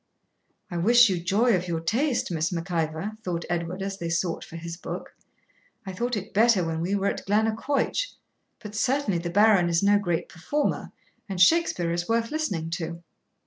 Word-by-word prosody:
'I 175 - -3
wish 235 +6 +6
you 185 -2 0
joy 205 +6 +2
of 180 0 -2
your 165 -2 -1
taste, 235 - 0
Miss 165 0 0
Mac 175 +1 -4
Ivor,' 160 +4 -1
thought 175 -5 -3
Edward, 175 +2 -2
as 195 0 -4
they 170 - -3
sought 170 0 -1
for - - -11
his 170 0 -6
book. 170 - -7 0.7
'I 190 - -5
thought 240 +4 -1
it 195 - -7
better 215 -4 +4
when 165 0 -2
we 185 +4 0
were 200 -1 -1
at - - -1
Glennaquoich; 225 - +1 0.5
but 210 -2 -10
certainly 245 -4 +1
the 170 +1 -4
Baron 200 -1 +4
is 170 +2 +1
no 205 +1 +5
great 175 -5 -1
performer, 290 - -2 0.4
and 190 -2 -4
Shakspeare 185 - +4
is 175 +3 -2
worth 230 0 +1
listening 195 - -2
to.' 170 0 -4
185 Hz, 185 wpm, -26 LUFS, 170-220 Hz, 0.7 s, wish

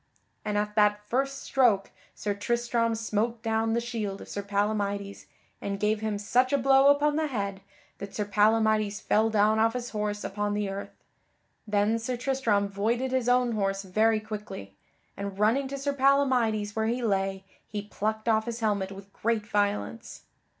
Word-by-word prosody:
And 210 -1 -1
at 210 0 -1
that 210 -1 +2
first 275 +4 -1
stroke 235 -7 +2 0.2
Sir 205 - -2
Tristram 235 +2 0
smote 225 +1 -2
down 225 0 +1
the 235 - +2
shield 225 -5 -4
of - - -10
Sir 200 - -3
Palamydes, 200 0 -2 0.3
and 200 0 -3
gave 210 +1 +1
him 215 -2 -1
such 245 +6 +2
a 280 - +3
blow 270 +1 +5
upon 290 +1 +4
the 315 -1 +1
head 200 -7 -3 0.4
that 200 0 -7
Sir 210 - -1
Palamydes 215 0 +2
fell 220 +1 +2
down 215 0 +3
off 225 +1 +3
his 245 -1 -4
horse 210 -1 -2
upon 205 +1 -2
the 210 -1 -1
earth. 195 +1 -5 0.8
Then 210 +2 +2
Sir 245 +2 -3
Tristram 235 -6 +1
voided 230 +6 -1
his 255 -2 +1
own 250 -1 +3
horse 195 -2 -1
very 215 +4 +2
quickly, 210 - -8 0.4
and 200 -1 -5
running 230 +7 +2
to 275 +1 -5
Sir 280 +1 -1
Palamydes 255 -7 +2
where 220 0 0
he 240 +2 -1
lay 195 -2 0 0.2
he 205 -1 -4
plucked 215 +2 -3
off 220 -1 +3
his 235 0 -4
helmet 200 -4 0
with 195 0 -11
great 225 -1 -1
violence. 205 +2 -2
215 Hz, 170 wpm, -28 LUFS, 205-235 Hz, 0.8 s, blow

